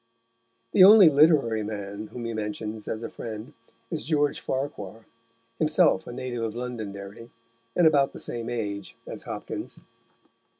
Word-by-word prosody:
The 185 Hz, -, +7 dB
only 200 Hz, -3 st, +10 dB
literary 140 Hz, -7 st, +4 dB
man 105 Hz, 0 st, -5 dB
whom 120 Hz, +1 st, -7 dB
he 115 Hz, -, -3 dB
mentions 105 Hz, 0 st, -5 dB
as 110 Hz, +1 st, -4 dB
a -, -, -3 dB
friend 115 Hz, +5 st, -7 dB, 0.4 s
is -, -, -3 dB
George 145 Hz, +1 st, +1 dB
Farquhar, 115 Hz, -6 st, -5 dB, 0.5 s
himself 155 Hz, 0 st, +3 dB
a -, -, -6 dB
native 120 Hz, -1 st, -4 dB
of 110 Hz, -1 st, -3 dB
Londonderry, 110 Hz, -3 st, -6 dB, 0.5 s
and 175 Hz, -, +4 dB
about 145 Hz, -3 st, +4 dB
the -, -, -10 dB
same 120 Hz, 0 st, -5 dB
age 100 Hz, -5 st, -4 dB
as -, -, -7 dB
Hopkins. -, -, -6 dB
115 Hz, 140 wpm, -26 LUFS, 105-140 Hz, 0.5 s, only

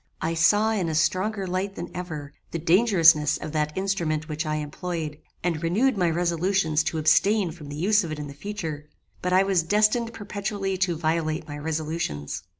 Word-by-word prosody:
"I 165 Hz, -, -1 dB
saw 205 Hz, +7 st, +4 dB
in 190 Hz, -6 st, 0 dB
a 160 Hz, -, -2 dB
stronger 190 Hz, +5 st, +1 dB
light 190 Hz, +2 st, -2 dB
than 175 Hz, -, -6 dB
ever, 155 Hz, -5 st, -6 dB, 0.2 s
the -, -, -3 dB
dangerousness 165 Hz, -4 st, +4 dB
of 155 Hz, -, -6 dB
that 150 Hz, 0 st, -1 dB
instrument 170 Hz, -5 st, -1 dB
which 155 Hz, 0 st, -3 dB
I 155 Hz, -, 0 dB
employed, 155 Hz, 0 st, -4 dB, 0.2 s
and 165 Hz, -3 st, -1 dB
renewed 215 Hz, +10 st, +2 dB
my 180 Hz, -4 st, +2 dB
resolutions 170 Hz, -1 st, +1 dB
to 160 Hz, -, -1 dB
abstain 195 Hz, +4 st, +3 dB
from 155 Hz, -3 st, -11 dB
the 145 Hz, -, -6 dB
use 205 Hz, +6 st, +3 dB
of 165 Hz, -, -5 dB
it 155 Hz, -, -4 dB
in 145 Hz, -1 st, -6 dB
future; 155 Hz, -4 st, -6 dB, 0.3 s
but 180 Hz, -, -1 dB
I 185 Hz, +1 st, +5 dB
was 195 Hz, -3 st, +2 dB
destined 215 Hz, +6 st, +2 dB
perpetually 200 Hz, -2 st, -3 dB
to 180 Hz, -3 st, +1 dB
violate 160 Hz, -1 st, -1 dB
my 145 Hz, -1 st, -6 dB
resolutions. 155 Hz, -, -3 dB
170 Hz, 180 wpm, -25 LUFS, 155-195 Hz, 0.3 s, I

